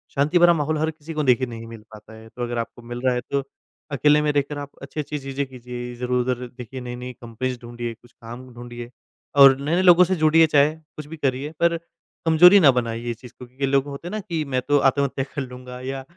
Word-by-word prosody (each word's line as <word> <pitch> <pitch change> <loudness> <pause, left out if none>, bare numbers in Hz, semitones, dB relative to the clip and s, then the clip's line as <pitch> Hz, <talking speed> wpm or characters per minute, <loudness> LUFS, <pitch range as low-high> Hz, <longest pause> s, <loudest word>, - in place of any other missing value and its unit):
शांति 150 +5 +2
भरा 175 0 +7
माहौल 155 -1 -1
हर 155 +1 0
किसी 160 +1 -10
को 150 -1 -1
देखिए 130 -1 +3
नहीं 115 -1 -8
मिल 115 -1 -10
पाता 110 +1 -13
है। 110 0 -13
तो 120 - -6
अगर 120 0 -3
आपको 115 +1 -5
मिल 120 +1 -7
रहा 130 - +3
है 125 - -1
तो 140 -1 0 0.5
अकेले 150 +1 +4
में 150 - +1
रह 145 -1 +2
कर 145 - -4
आप 145 - -7
अच्छी-अच्छी 150 +2 -5
चीज़ें 135 0 -3
कीजिए 125 -1 -8
इधर-उधर 125 0 -1
देखिए 125 +2 -8
नई-नई 125 +1 -6
कंपनीज 120 +2 -4
ढूँढ़िए, 120 0 -6
कुछ 120 +2 -22
काम 120 +2 -11
ढूँढ़िए। 120 0 -9 0.5
और 135 -1 +8
नए 150 +4 0
नए 180 - +2
लोगों 180 -1 +7
से 185 +1 +1
जुड़िए 160 0 +5
चाहे 145 0 +4
कुछ 155 -1 -12
भी 160 - -9
करिए 140 0 -1
पर 170 0 +3 0.5
कमज़ोरी 180 +5 +7
ना 145 -6 +7
बनाइए 120 -1 -3
ये 120 - -1
चीज़ 120 +1 -14
को, 125 - -8
क्योंकि 130 +3 -4
लोग 135 0 +2
होते 140 +4 -7
हैं - - -6
ना 215 - -3
कि 170 -6 -3
मैं 130 - +2
तो 145 - +4
आत्महत्या 135 0 +1
कर 140 - -1
लूँगा 125 -1 -9
या, 135 +1 -5
135 Hz, 235 wpm, -23 LUFS, 120-150 Hz, 0.5 s, और